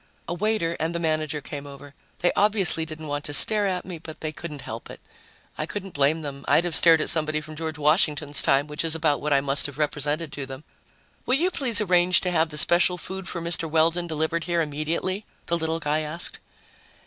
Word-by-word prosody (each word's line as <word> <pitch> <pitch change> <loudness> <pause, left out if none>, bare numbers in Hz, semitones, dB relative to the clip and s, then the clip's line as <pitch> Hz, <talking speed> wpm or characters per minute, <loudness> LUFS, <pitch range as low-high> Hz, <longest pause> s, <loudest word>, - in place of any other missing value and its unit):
A 170 - -3
waiter 180 -3 -1
and 165 +2 -2
the - - -1
manager 155 -2 -1
came 145 0 -8
over. 140 0 -12 0.3
They 175 - +3
obviously 200 -6 +3
didn't 155 0 -8
want 145 -1 -4
to 145 - +3
stare 210 +5 +7
at 185 -2 -3
me, 175 -3 -7
but 155 -1 -10
they 155 - -3
couldn't 155 -3 -8
help 115 -1 -8
it. - - -10 0.6
I 155 - -2
couldn't 195 -1 -6
blame 150 +3 +1
them, 140 -1 -7
I'd 170 - +4
have 175 -2 -1
stared 165 -2 +6
at - - +2
somebody 155 -1 0
from 155 0 -10
George 160 0 -5
Washington's 150 -1 +3
time, 135 +1 +2
which 150 +1 -3
is 165 -1 -1
about 155 -3 0
what 150 - -3
I 140 -1 +4
must 140 +1 +2
have 145 -1 -10
represented 150 +1 -2
to 140 -2 -6
them. 135 +2 -9 0.6
"Will 255 - +3
you 355 +5 +1
please 240 - +1
arrange 180 -2 +3
to 180 - -2
have 160 -1 +1
the 150 - -6
special 175 +4 +3
food 190 +1 -7
for 170 - -5
Mr. 170 -1 0
Weldon 165 +2 +1
delivered 160 +1 -2
here 175 -1 0
immediately?" 165 +6 -2 0.2
the 170 - 0
little 160 0 -2
guy 150 0 -1
asked. 155 +3 -3
160 Hz, 220 wpm, -24 LUFS, 150-175 Hz, 0.6 s, stare